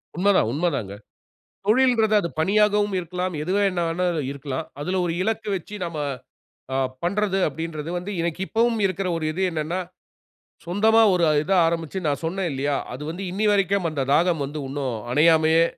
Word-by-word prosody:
உண்மைதான். 185 - +3
உண்மை 170 +6 +1
தாங்க, 100 -5 -4 0.7
தொழில்ங்கிறது 225 -2 +3
அது 170 - -3
பணியாகவும் 205 +2 +2
இருக்கலாம். 180 0 -3
எதுவேணாலும் 180 -2 0
இருக்கலாம். 140 -1 -5
அதில 185 +5 -1
ஒரு 165 - -1
இலக்கு 220 -1 -2
வச்சு, 185 +4 -8
நாம 170 -2 -5 0.8
அ - - +1 0.3
பண்ணுறது 195 +1 0
அப்டின்றது 160 +1 -4
வந்து 185 +4 -6
இன்னைக்கு 170 +1 -2
இப்பவும் 230 0 +1
இருக்கிற 190 0 -2
ஒரு 160 - -3
இது 190 +4 -3
என்னனா, 160 +3 -2 0.9
சொந்தமா 220 +6 +4
ஒரு 175 -2 +2 0.2
இது 195 - -2
ஆரம்பிச்சு 165 +2 -2
நான் 145 +2 -1
சொன்னேன் 180 +2 -1
இல்லையா? 140 +1 -1 0.2
அது 130 +4 -7
வந்து 180 +4 -6
இன்னைய 210 +3 0
வரைக்கும் 195 -3 +1
அந்த 140 -3 -2
தாகம் 165 -2 +3
வந்து 145 +2 -5
இன்னும் 135 -4 -3 0.2
அணையாமயே 160 +2 +5
175 Hz, 150 wpm, -23 LUFS, 155-200 Hz, 0.9 s, அணையாமயே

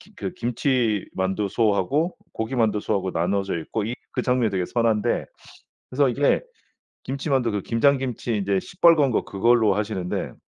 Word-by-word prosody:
그 185 - -4
김치만두소하고 110 - 0 0.2
고기만두소하고 110 -5 0
나누어져 95 +2 -1
있고 105 +7 -3
이 115 +3 -3 0.2
그 - - -1
장면이 125 -3 +1
되게 95 -2 -1
선한데 115 0 0 0.6
그래서 140 +2 +2
이게 140 +4 +2 0.6
김치만두 135 -3 -1
그 105 -2 -2
김장 135 +7 +2
김치 125 -3 -3
이제 100 -1 0
시뻘건 165 - +3
거 - - +1
그걸로 110 +1 +3
하시는데. 105 -4 -3
115 Hz, 330 characters per minute, -24 LUFS, 100-130 Hz, 0.6 s, 시뻘건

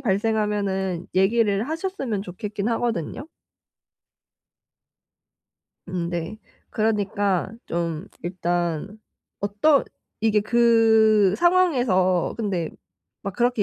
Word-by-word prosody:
발생하면은 200 -3 -1
얘기를 210 +3 +2
하셨으면 320 - -3
좋겠긴 205 +3 -4
하거든요. 230 - -2 2.6
음네. 175 +2 -3 0.3
그러니까 205 -3 0 0.2
좀 170 +1 -3 0.2
일단 175 +2 -2 0.4
어떤 210 +9 +3 0.4
이게 215 -1 +3
그 220 -3 +4
상황에서 245 - +2
근데 190 -7 -2 0.5
막 200 -1 -5
그렇게 240 -3 +1
205 Hz, 190 characters per minute, -23 LUFS, 185-225 Hz, 2.6 s, 그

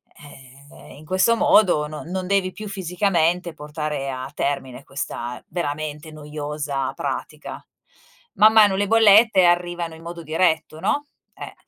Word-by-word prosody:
Eh, 140 -1 -15
in 155 +2 -14
questo 190 +7 +2
modo 185 -9 +4
no 155 0 -8
non 185 +2 -4
devi 190 -1 +1
più 215 +2 -8
fisicamente 180 -3 0
portare 150 -2 -5
a 130 0 -5
termine 135 -3 -3
questa 125 -3 -6
veramente 155 -2 -4
noiosa 150 -2 -4
pratica. - - -6 0.7
Man 215 +1 +6
mano 210 -3 +6
le 200 +1 0
bollette 220 -3 +6
arrivano 175 -1 0
in 160 - -14
modo 170 0 -8
diretto, 160 0 0
no, 290 - -1 0.3
eh. - - -9
160 Hz, 135 wpm, -22 LUFS, 145-190 Hz, 0.7 s, Man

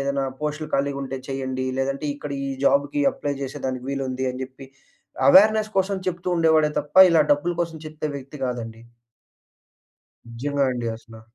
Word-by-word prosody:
ఏదైనా 140 0 -1 0.2
పోస్టులు 150 +1 -3
ఖాళీగా 140 0 0
ఉంటే 135 0 -4
చేయండి. 130 -1 -3
లేదంటే 135 +2 -2
ఇక్కడ 145 0 -8 0.2
ఈ - - -3 0.2
జాబ్‌కి 145 - +2
అప్లై 145 - -3
చేసేదానికి 130 -1 -4
వీలుంది 130 -1 -2
అని 130 +1 -5
చెప్పి, 130 +1 -13 0.6
అవేర్నెస్ 215 +3 +6
కోసం 195 +1 +1
చెప్తూ 180 0 -4
ఉండేవాడే 160 -2 +4
తప్ప 150 +4 -14
ఇలా 165 -2 +5
డబ్బుల 145 +5 0
కోసం 165 -1 -6
చెప్తే 155 0 -5
వ్యక్తి 140 +2 -10
కాదండి. 115 -2 -5 1.5
నిజంగా 140 +4 -1
అండి 120 -2 -3
అసలా. 110 -1 -14
140 Hz, 150 wpm, -23 LUFS, 130-155 Hz, 1.5 s, అవేర్నెస్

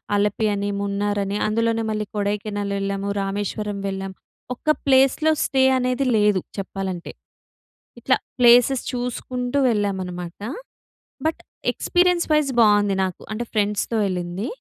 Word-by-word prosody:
అలపి 210 +1 +1
అని, 200 0 -2
మున్నార్ 205 +1 -1
అని 200 +1 -2
అందులోనే 225 +1 +1
మళ్ళీ 215 -1 -2
కొడైకెనాల్ 205 0 -2
వెళ్ళాము. 195 0 -2
రామేశ్వరం 205 +1 -3
వెళ్ళాము. 195 0 -4 0.4
ఒక్క 245 - -31 0.2
ప్లేస్‌లో 270 +3 +4
స్టే 265 -1 +2
అనేది 255 +1 0
లేదు 210 -3 +3 0.2
చెప్పాలంటే. 190 -2 -4 0.9
ఇట్లా - - +2 0.2
ప్లేసెస్ 245 +2 +6
చూసుకుంటూ 250 +1 -3
వెళ్ళామనమాట. 185 -5 -3 0.8
బట్ 320 - 0 0.3
ఎక్స్పీరియన్స్ 355 -1 +2
వైస్ 300 -3 +2
బాగుంది 205 -2 +4
నాకు. 185 -2 -6
అంటే 235 +3 -3
ఫ్రెండ్స్‌తో 210 +1 0
వెళ్ళింది. 180 +2 -3
205 Hz, 115 wpm, -22 LUFS, 195-245 Hz, 0.9 s, ప్లేసెస్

